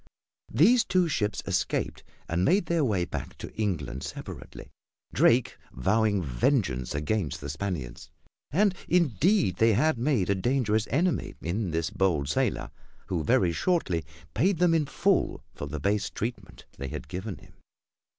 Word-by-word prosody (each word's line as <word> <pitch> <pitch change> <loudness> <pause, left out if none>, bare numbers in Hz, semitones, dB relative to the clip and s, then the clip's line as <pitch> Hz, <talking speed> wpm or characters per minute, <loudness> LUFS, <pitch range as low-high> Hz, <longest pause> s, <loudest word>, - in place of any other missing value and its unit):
These 220 - +5
two 185 -5 +2
ships 105 -9 -1
escaped - - -1 0.2
and 85 +2 0
made 185 - +3
their 165 -1 +1
way 100 -9 +1
back - - -6
to - - -8
England 80 - -2
separately, - - -8 0.4
Drake 120 +1 +3
vowing 100 - +1
vengeance 65 - 0
against 75 +3 -1
the 70 -1 -5
Spaniards. 75 -8 -5 0.4
And 195 +6 +3 0.2
indeed 170 - +3
they 115 0 +4
had 130 +4 +2
made 120 -8 +1
a - - +5
dangerous 110 +1 +1
enemy 170 +8 0
in 95 +4 -2
this 80 0 -1
bold 80 -8 +1
sailor, - - 0 0.4
who 85 -4 -1
very 85 +4 +3
shortly 95 - 0 0.3
paid 180 - +2
them 175 0 +4
in 155 -3 +2
full 185 +6 +1
for 70 - -6
the 75 +2 -5
base 100 +6 0
treatment 100 -4 -6
they 70 - -4
had - - -6
given 95 +2 -5
him. - - -17
105 Hz, 150 wpm, -27 LUFS, -, 0.4 s, These